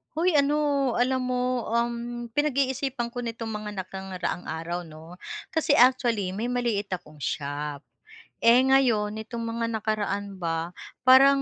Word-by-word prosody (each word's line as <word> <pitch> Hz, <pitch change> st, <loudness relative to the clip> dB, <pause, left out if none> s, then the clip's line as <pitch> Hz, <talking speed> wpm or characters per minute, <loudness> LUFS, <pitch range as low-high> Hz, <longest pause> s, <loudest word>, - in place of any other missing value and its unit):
Hoy 335 Hz, 0 st, +3 dB
ano, 285 Hz, -2 st, +2 dB
alam 255 Hz, +2 st, +1 dB
mo, 250 Hz, -1 st, 0 dB
um, 235 Hz, 0 st, -2 dB
pinag-iisipan 265 Hz, -3 st, 0 dB
ko 245 Hz, 0 st, -5 dB
nitong 230 Hz, -1 st, -4 dB
mga 210 Hz, -2 st, -4 dB
nakaraang 185 Hz, -1 st, -5 dB
araw 170 Hz, +2 st, -4 dB
'no, 160 Hz, +2 st, -12 dB, 0.3 s
kasi 320 Hz, -2 st, +2 dB
actually 240 Hz, -6 st, +4 dB
may 200 Hz, +5 st, -3 dB
maliit 240 Hz, -4 st, 0 dB
akong 155 Hz, -4 st, -7 dB
shop, 145 Hz, 0 st, -3 dB, 0.6 s
eh, 235 Hz, +2 st, +7 dB
ngayon 260 Hz, -6 st, +3 dB
nitong 225 Hz, +2 st, -5 dB
mga 230 Hz, 0 st, -2 dB
nakaraan 205 Hz, -2 st, -2 dB
ba, 165 Hz, -1 st, -2 dB, 0.4 s
parang 275 Hz, +2 st, +7 dB
235 Hz, 130 wpm, -26 LUFS, 190-255 Hz, 0.6 s, eh